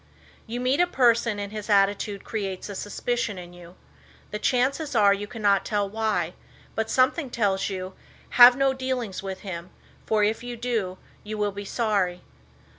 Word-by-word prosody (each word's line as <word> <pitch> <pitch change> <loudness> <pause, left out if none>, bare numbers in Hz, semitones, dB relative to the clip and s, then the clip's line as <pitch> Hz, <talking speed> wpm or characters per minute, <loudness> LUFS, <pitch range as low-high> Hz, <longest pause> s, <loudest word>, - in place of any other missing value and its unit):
You 235 +2 -4
meet 255 +4 +1
a 355 - +4
person 235 -7 +3
and 205 0 -5
his 215 0 -6
attitude 200 0 +2
creates 195 -3 -4
a 200 - -6
suspicion 210 +1 -2
in 175 -1 -9
you. 175 0 -13 0.6
The 210 - -3
chances 270 +4 0
are 205 -3 +6
you 205 +1 -4
cannot 205 -3 +1
tell 205 -2 0
why, 205 -5 -1 0.4
but 220 0 -2
something 260 +3 +2
tells 200 -5 0
you, 185 -1 -5 0.4
"Have 245 0 +9
no 275 -1 +3
dealings 260 -6 -3
with 190 -1 -6
him, 175 -3 -6 0.4
for 215 -1 +2
if 215 +2 +1
you 245 -1 -6
do, 225 -6 -2 0.3
you 215 +1 -5
will 205 -1 0
be 200 +1 -7
sorry." 195 -5 0
210 Hz, 170 wpm, -25 LUFS, 195-240 Hz, 0.6 s, Have